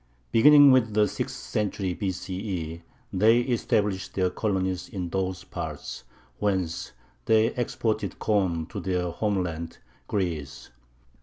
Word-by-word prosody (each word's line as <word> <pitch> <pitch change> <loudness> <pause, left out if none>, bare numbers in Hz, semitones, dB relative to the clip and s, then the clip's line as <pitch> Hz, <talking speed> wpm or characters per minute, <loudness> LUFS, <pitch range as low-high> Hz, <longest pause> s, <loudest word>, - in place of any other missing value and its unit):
Beginning 145 +3 +8
with 115 -5 +3
the 105 -1 +4
sixth - - -4
century 100 -3 -2
B.C.E., 90 -3 -4 0.3
they 110 +5 +5
established 110 -5 0
their 95 -2 +1
colonies 95 -3 -1
in 90 -3 -4
those 95 -1 -2
parts, - - -6 0.3
whence 95 -9 -1 0.3
they 110 +1 +3
exported 110 -5 -2
corn 95 -6 +1
to 100 +5 -7
their 90 -2 -1
homeland, 85 -4 -2 0.3
Greece. 80 -11 -3
95 Hz, 110 wpm, -26 LUFS, 90-110 Hz, 0.3 s, Beginning